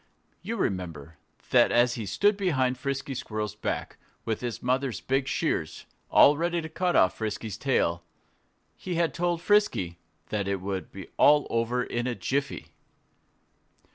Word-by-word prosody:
You 230 - -4
remember 85 - -3 0.3
that - - +5
as 120 +1 +4
he 110 -4 -5
stood 205 - +3
behind 140 -10 +1
Frisky 140 +1 -3
Squirrel's 110 -4 -4
back 105 - -4 0.3
with 110 -2 -2
his 120 -2 -4
mother's 130 0 0
big 135 +1 0
shears, - - -2 0.2
all 145 - +7
ready 170 +1 0
to 160 -1 -6
cut 175 +2 0
off 95 0 +4
Frisky's 110 -1 -3
tail, 85 -9 0 0.7
he 180 -2 -5
had 170 -1 +1
told 175 0 -1
Frisky 205 - +2 0.3
that 100 -2 -2
"it 100 -1 -1
would 95 0 -4 0.3
all 150 0 +6
be - - -11
over 120 +2 +1
in 120 0 -3
a 125 - -1
jiffy"? 140 +3 -3
125 Hz, 150 wpm, -27 LUFS, 105-160 Hz, 0.7 s, all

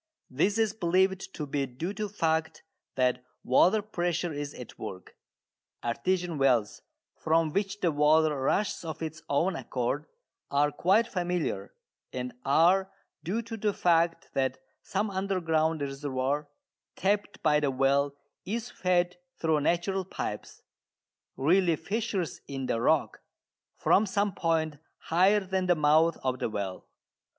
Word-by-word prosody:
This 190 +11 +1
is 220 -2 +2
believed 190 0 +1
to 150 - -3
be 140 -1 -1
due 155 +10 -5
to 210 +1 -3
the - - -15
fact 160 -3 0 0.3
that 125 -1 +1 0.2
water 185 - +4
pressure 175 -4 -1
is 145 0 -5
at 125 - -10
work. 95 -1 -8 0.7
Artesian 175 +6 -1
wells, 125 -6 +2 0.3
from 160 -1 +1
which 200 0 -1
the 175 - +2
water 150 +1 +4
rushes 200 +10 0
of 160 -1 -5
its 155 0 -5
own 165 +6 +1
accord, 135 +2 -2 0.4
are 145 +1 +2
quite 195 +10 +3
familiar, 175 - -2 0.4
and 125 -1 -4
are 180 +7 +4 0.3
due 220 +7 -2
to 225 0 -6
the 210 -1 0
fact 170 -1 +2
that 130 -1 0 0.2
some 205 +1 -2
underground 165 -5 0
reservoir 140 +1 -2 0.5
tapped 205 +2 -1
by 150 -2 +4
the 145 -2 +1
well 140 +2 +2 0.3
is 235 +4 -4
fed 180 -3 +1 0.2
through 160 -2 +2
natural 175 +5 0
pipes, 185 - -6 0.7
really 170 +4 +3
fissures 200 -2 -3
in 135 -1 -4
the 115 - -1
rock, - - +1 0.6
from 210 +2 +3
some 200 0 0
point 160 -3 0 0.2
higher 190 +5 +3
than 190 -1 -1
the 175 - +4
mouth 155 +2 +4
of 130 -1 -1
the - - -1
well. 100 -3 -5
165 Hz, 140 wpm, -29 LUFS, 140-190 Hz, 0.7 s, water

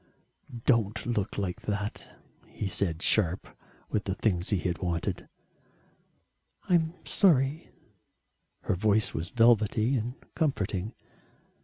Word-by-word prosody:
"Don't 115 -4 +2
look 105 -4 -2
like 95 -3 -3
that," 105 0 -5 0.3
he - - -6
said 90 -3 0
sharp 95 -4 +2 0.4
with 105 - -1
the 95 - -2
things 90 -5 0
he 100 - +2
had 90 -1 -2
wanted. 90 +1 -3 1.4
"I'm 165 -1 +2
sorry," 150 -5 +2 0.9
her - - -1
voice 105 +3 +2
was 80 +3 -4
velvety 115 +1 +3
and 120 +3 -3 0.2
comforting. 105 - -1
105 Hz, 110 wpm, -28 LUFS, 95-120 Hz, 1.4 s, velvety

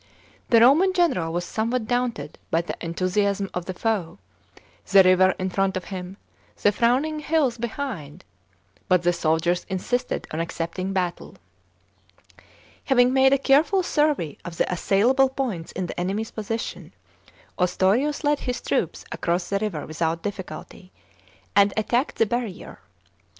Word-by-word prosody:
The 230 -1 +6
Roman 315 +11 +5
general 315 - +1
was 175 +1 -2
somewhat 230 +3 -1
daunted 240 - -2
by 165 - +2
the 170 - -5
enthusiasm 195 +3 -1
of 180 -1 -4
the 185 - -4
foe, 200 - -2 0.7
the 195 -1 +8
river 185 0 +4
in 185 0 -3
front 195 0 0
of 185 - -5
him, 185 +1 -6 0.5
the 205 - +5
frowning 260 +8 +1
hills 295 -6 0
behind, 225 - -5 0.6
but 180 -1 +3
the 175 0 +3
soldiers 170 +2 +1
insisted 245 +7 -2
on 155 - -3
accepting 170 +3 -3
battle. 180 -2 -3 1.5
Having 250 -1 +4
made 265 0 +5
a 275 - +5
careful 300 +8 +3
survey 295 - 0
of 170 -1 -8
the - - +2
assailable 240 +9 +3
points 245 -11 -4
in 185 - -3
the 175 - -6
enemy's 200 +5 -2
position, 225 +1 -5 0.7
Ostorius 195 - +1
led 295 0 +2
his 250 -1 -3
troops - - -2
across 175 +1 -1
the 200 - 0
river 200 -8 -3
without 165 +1 -2
difficulty, 190 -2 -7 0.6
and 200 0 +5
attacked 240 +5 0
the 225 - +3
barrier. 230 -4 -4
200 Hz, 140 wpm, -24 LUFS, 180-250 Hz, 1.5 s, the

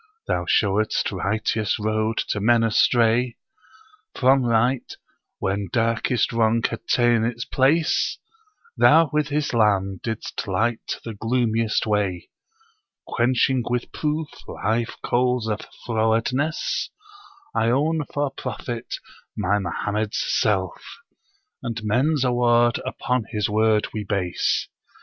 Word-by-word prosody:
Thou 90 - -1
showedst 105 +4 +1
righteous 105 +2 -1
road 110 +1 -1
to 105 - -1
men 115 +2 +3
astray 115 +1 +3 0.8
From 130 0 +4
right, 120 +2 +1 0.4
when 95 0 -2
darkest 115 -1 +1
wrong 115 0 +2
had 115 - -7
ta'en 120 -2 +3
its 120 +1 -2
place: 155 +5 +2 0.6
Thou 160 0 +5
with 150 -1 +1
Islâm 105 -10 +1
didst 110 -2 -4
light 110 +5 -1
the 115 - -5
gloomiest 115 0 0
way, 100 -5 -1 0.8
Quenching 125 +1 +2
with 120 0 -2
proof 155 0 -2 0.2
live 115 +3 -2
coals 125 -1 +1
of 110 -1 -2 0.2
frowardness: 125 - 0 0.6
I 115 - +2
own 150 +5 +1
for 145 -1 -1
Prophet, 120 -1 -5 0.4
my 105 0 +1
Mohammed's 105 +3 -2
self, 95 -5 0 0.8
and 115 -1 -4
men's 130 +7 +1
award 120 -1 +3
upon 125 -2 -1
his 105 -2 -1
word 110 0 +2
we 110 - -3
base. 95 -3 -1
115 Hz, 110 wpm, -23 LUFS, 105-125 Hz, 0.8 s, Thou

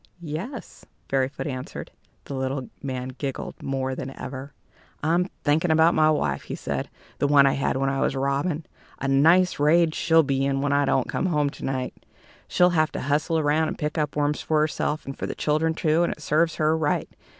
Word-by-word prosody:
"Yes," 175 - -6 0.3
Fairyfoot 135 +1 -1
answered. 130 -3 -6 0.3
The - - -7
little 130 0 -3
man 130 -2 -4
giggled 135 +1 -5
more 135 -1 -2
than 130 0 -5
ever. 135 +1 -6 0.5
"I'm 170 +4 +2 0.2
thinking 160 +4 +2
about 160 +2 +5
my 155 0 +4
wife," 75 - 0
he - - -5
said - - -4 0.3
"the 145 - +2
one 140 -1 +6
I 135 - +4
had 135 -1 0
when 135 0 0
I 135 - -1
was - - +1
a - - -2
robin. 145 +4 -1 0.3
A 135 - -3
nice 165 +7 +4
rage 160 +2 +4
she'll 165 0 +4
be 135 -1 0
in 135 0 +1
when 140 0 0
I 145 0 +3
don't 130 - +1
come - - -1
home 150 -5 +1
to 140 - -12
night! 130 -1 -2 0.5
She'll 180 0 +4
have 155 -2 +2
to - - -3
hustle 150 +4 +1
around 155 +1 +2
and - - -4
pick 150 +1 -2
up 150 -1 -1
worms 150 0 0
for 155 -1 +1
herself, 155 0 -1
and 135 - -6
for - - -4
the - - -5
children 160 +2 +1
too, 160 +1 +2
and 175 - +2
it - - -16
serves 160 +3 +2
her 155 +1 +2
right. 155 -2 0
150 Hz, 205 wpm, -25 LUFS, 135-160 Hz, 0.5 s, one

